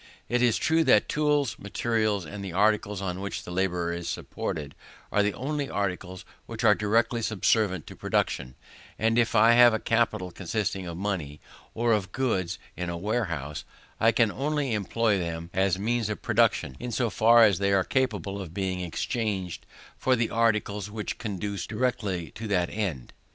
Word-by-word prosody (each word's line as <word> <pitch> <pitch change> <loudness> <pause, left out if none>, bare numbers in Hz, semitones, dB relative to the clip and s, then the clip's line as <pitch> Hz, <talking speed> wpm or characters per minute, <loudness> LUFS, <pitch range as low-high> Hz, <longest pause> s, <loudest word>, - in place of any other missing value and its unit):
It 120 0 +1
is 120 -3 +3
true 160 0 +2
that 115 -6 +5
tools, 150 -4 +1
materials, 105 -1 -1
and 100 +5 -7
the 95 -3 -6
articles 105 0 +1
on 90 0 -3
which 100 0 -4
the - - -8
labourer 90 -2 0
is 85 0 -4
supported, 75 -2 -4 0.4
are 105 - +3
the 105 0 0
only 145 +2 -3
articles 95 -2 -3 0.2
which - - -6
are - - +7
directly 115 +3 +1
subservient 105 -4 +1
to - - -10
production: 65 -1 -1 0.4
and 115 +1 +2
if 115 -2 +1
I 110 +2 +7
have 120 -1 +7
a - - -1
capital 110 -5 0
consisting 95 0 -3
of 85 -1 -6
money, 90 -7 -3 0.4
or 115 0 +2
of 100 -4 -1
goods 95 -8 -1 0.2
in 90 -1 -4
a 85 - -3
warehouse, 85 - -2 0.4
I 115 - +5
can 115 -2 +3
only 145 -1 -1
employ 105 0 +1
them 85 0 -4
as 95 -1 +2
means 115 +2 0
of 105 - -5
production 65 - +2
in 125 - -5
so 120 -1 0
far 115 +1 +6
as 100 -4 +4
they 100 0 +1
are 95 -1 +3
capable 105 -6 -1
of 90 -2 -9
being 95 -2 -2
exchanged 95 0 -3 0.3
for 130 - +3
the 115 -2 -1
articles 110 -3 +1
which 105 0 -5
conduce 100 -2 -4
directly 105 -7 -2
to 110 - -7
that 90 -4 +1
end. 90 - -3
105 Hz, 175 wpm, -27 LUFS, 90-115 Hz, 0.4 s, are